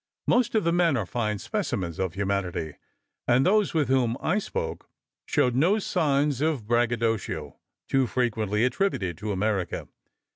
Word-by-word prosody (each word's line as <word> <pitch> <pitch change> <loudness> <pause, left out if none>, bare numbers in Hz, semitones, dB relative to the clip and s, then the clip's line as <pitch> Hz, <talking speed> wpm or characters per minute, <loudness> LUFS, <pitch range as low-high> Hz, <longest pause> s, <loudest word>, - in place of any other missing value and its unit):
Most 240 -2 +2
of 220 - +3
the 170 - +2
men 170 -6 +3
are - - -1
fine 105 -3 -2
specimens 85 -3 -3
of 95 -2 -2
humanity, 95 -5 -2 0.5
and 125 +3 +4
those 205 -2 +3
with 150 -4 +2
whom 125 -2 +2
I 195 +6 +1
spoke 80 - -5 0.4
showed 125 - +2
no 165 - +3
signs 145 - +1
of 150 -8 0
braggadocio, 115 -2 0 0.3
too 135 -2 +2
frequently 110 -3 0
attributed 125 - 0
to 105 +1 -3
America. 100 -2 -1
120 Hz, 145 wpm, -26 LUFS, 100-155 Hz, 0.5 s, and